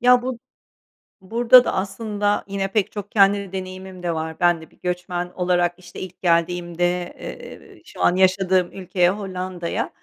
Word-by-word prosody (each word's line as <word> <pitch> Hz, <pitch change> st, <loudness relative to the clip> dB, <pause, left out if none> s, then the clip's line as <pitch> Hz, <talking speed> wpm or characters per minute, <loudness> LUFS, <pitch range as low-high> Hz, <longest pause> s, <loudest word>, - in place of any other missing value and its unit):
Ya, 250 Hz, 0 st, +5 dB
bu 255 Hz, -2 st, -3 dB, 0.8 s
burada 235 Hz, +5 st, +6 dB
da -, -, -1 dB
aslında 205 Hz, +1 st, -1 dB
yine 195 Hz, 0 st, -2 dB
pek 210 Hz, -2 st, +1 dB
çok 205 Hz, -1 st, -7 dB
kendi 200 Hz, -2 st, +3 dB
deneyimim 185 Hz, -1 st, -7 dB
de 170 Hz, -, 0 dB
var. 160 Hz, +1 st, -4 dB
Ben 175 Hz, -2 st, +3 dB
de 160 Hz, -, -14 dB
bir -, -, -26 dB
göçmen 180 Hz, 0 st, -3 dB
olarak, 175 Hz, -1 st, +1 dB
işte, 175 Hz, -1 st, -12 dB
ilk 185 Hz, -1 st, -9 dB
geldiğimde, 175 Hz, 0 st, 0 dB
eee, -, -, -10 dB
şu -, -, -10 dB
an 180 Hz, -, +4 dB
yaşadığım 185 Hz, -1 st, +3 dB
ülkeye, 180 Hz, -1 st, +1 dB
Hollanda'ya, 185 Hz, -3 st, -4 dB
185 Hz, 155 wpm, -22 LUFS, 175-200 Hz, 0.8 s, burada